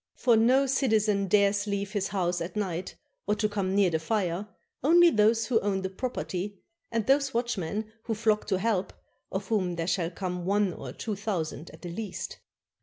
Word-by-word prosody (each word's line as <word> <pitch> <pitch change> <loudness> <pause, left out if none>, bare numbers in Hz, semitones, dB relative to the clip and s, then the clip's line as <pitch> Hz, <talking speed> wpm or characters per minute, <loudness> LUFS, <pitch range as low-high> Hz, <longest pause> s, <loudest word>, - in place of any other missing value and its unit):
For 240 -3 +4
no 250 +5 +4
citizen 220 -7 +2
dares 200 +1 +3
leave 200 -1 -2
his 205 -2 -1
house 180 -3 -1
at 170 +1 -5
night 185 -4 -3 0.3
or 210 - +2
to 215 0 +1
come 195 -2 -1
near 200 -3 +4
the 160 - +1
fire, 185 +1 -1 0.4
only 340 +4 +7
those 220 +1 +3
who 225 -1 +2
own 195 -1 -1
the 190 - -3
property, 200 -3 -4 0.3
and 230 -2 0
those 275 0 +2
watchmen 220 -2 -2
who 225 - -1
flock 215 -1 +1
to 190 - +1
help, 195 -2 0 0.4
of 190 0 -4
whom 185 -5 +1
there 165 -1 -2
shall 170 -1 0
come 180 0 -4
one 200 0 +1
or - - -7
two 220 - -4
thou 200 -4 -1
sand 155 +1 -8
at - - -15
the 175 - -5
least. 210 +4 -5
205 Hz, 190 wpm, -28 LUFS, 185-220 Hz, 0.4 s, only